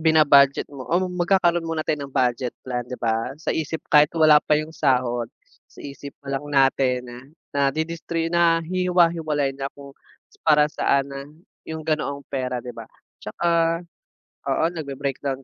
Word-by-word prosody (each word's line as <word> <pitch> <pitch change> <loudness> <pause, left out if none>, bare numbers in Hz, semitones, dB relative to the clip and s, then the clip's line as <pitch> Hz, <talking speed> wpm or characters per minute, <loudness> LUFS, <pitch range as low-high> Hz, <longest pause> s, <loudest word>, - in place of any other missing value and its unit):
bina-budget 150 -4 +5
mo 130 -3 -9
o 170 - +2
magkakaroon 175 -2 +1
muna 160 -1 -2
tayo 150 -2 -1
ng 135 - -21
budget 125 -1 0
plan, 125 -1 -2
'di 125 - -5
ba? 115 +3 -2
Sa 155 - -3
isip 160 0 -3
kahit 150 0 +7
wala 155 -2 +6
pa 150 - +2
yung 155 +1 -4
sahod, 125 -5 0 0.4
sa - - -14
isip 140 0 -9
palang 140 +1 -4
natin 135 -2 +2 0.5
nadidistri 165 +4 -1
nahihiwa-hiwalay 165 -3 +2
na 135 0 -5
kung 140 -1 -12 0.5
para 150 -1 +4
saan 140 -1 +1
na 140 +1 -7 0.4
yung 160 -1 -6
ganoong 145 -3 -2
pera, 125 -2 -3
'di 125 - -6
ba. - - -10 0.3
Tsaka 165 +7 0 0.7
oo, - - +1
nagbe-breakdown 140 -3 -4
145 Hz, 145 wpm, -23 LUFS, 135-165 Hz, 0.7 s, kahit